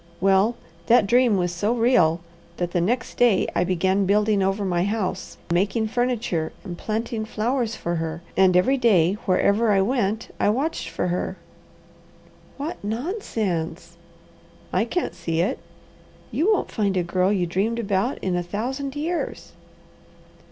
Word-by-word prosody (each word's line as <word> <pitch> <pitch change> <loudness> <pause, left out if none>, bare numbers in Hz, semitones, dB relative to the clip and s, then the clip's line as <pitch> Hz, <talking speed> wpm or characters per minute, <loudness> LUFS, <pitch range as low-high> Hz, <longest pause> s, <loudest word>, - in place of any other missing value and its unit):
Well, 195 +5 +3 0.3
that 235 -2 +5
dream 240 0 +4
was 175 -1 0
so 210 +7 0
real, 225 -9 +3 0.4
that 175 -1 -2
the 175 - +1
next 230 +7 -1
day 240 -5 +4
I - - +2
began 185 +2 +1
building 210 0 +3
over 195 +1 0
my 175 -2 +1
house, 205 -1 -3
making 200 +5 +1
furniture, 240 -9 -1
and 180 -3 -6
planting 220 +3 -3
flowers 230 +1 -1
for 170 -4 -3
her; 165 +1 -4
and 185 -2 +5
every 260 +10 +3
day, 195 -8 +4
wherever 200 +4 +3
I 195 -1 +4
went, 220 -1 -1
I - - +3
watched 265 - -1
for 165 +2 -2
her." 180 +2 -2 1.2
"What 290 -1 -5
nonsense!" 205 - -3 0.8
"I 225 - +2
can't 355 +9 -2
see 165 -1 -3
it." 175 - 0 0.7
"You 365 +8 +2
won't 420 - 0
find 200 -3 0
a 180 - +2
girl 185 +2 +1
you 190 -4 +1
dreamed 200 +7 -1
about 205 +2 0
in 185 -2 0
a 175 - 0
thousand 260 +10 -4
years." 330 +4 -3
205 Hz, 150 wpm, -23 LUFS, 180-235 Hz, 1.2 s, that